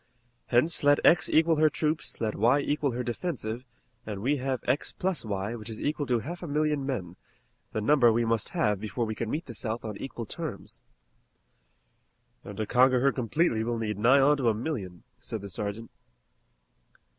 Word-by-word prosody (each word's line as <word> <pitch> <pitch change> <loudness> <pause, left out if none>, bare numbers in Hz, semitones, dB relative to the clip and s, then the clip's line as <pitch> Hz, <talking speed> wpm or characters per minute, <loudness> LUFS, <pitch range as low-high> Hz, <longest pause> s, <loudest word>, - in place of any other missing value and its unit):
Hence 130 +8 +2
let 145 0 +5
x 170 - +5
equal 160 0 +4
her 155 0 +5
troops, 155 +1 -2
let 110 -2 -1
y 120 +7 +3
equal 145 -2 0
her 125 +1 -2
defensive, 120 -3 -4 0.4
and 105 -2 -5
we 135 +8 +1
have 130 -2 -2
x 130 +4 0
plus 185 -2 -1
y, 100 0 -3
which 110 -1 -7
is 110 - -7
equal 145 -1 -2
to 125 - +2
half 170 +10 -6
a 175 - -5
million 150 -1 0
men, 90 -10 -4 0.5
the 110 - -2
number 120 0 +5
we 115 +1 +1
must 115 -2 0
have 105 -3 0
before 110 +3 -2
we 110 - -3
can 110 0 -4
meet 155 +7 -3
the 120 - -8
South 115 +1 -4
on 105 -2 -5
equal 120 -3 -6
terms." 145 -3 -7 1.6
"An' 100 - -8
to 110 - -2
conquer 125 +2 +4
her 140 +1 +4
completely 125 -1 0
we'll 120 +1 -1
need 105 -3 -3
nigh 125 +6 +5
on 145 +2 +4
to 125 -4 +2
a 110 - +1
million." 105 - -5 0.2
said 110 - -5
the 100 - -7
sergeant. 105 +4 -4
120 Hz, 190 wpm, -28 LUFS, 110-145 Hz, 1.6 s, let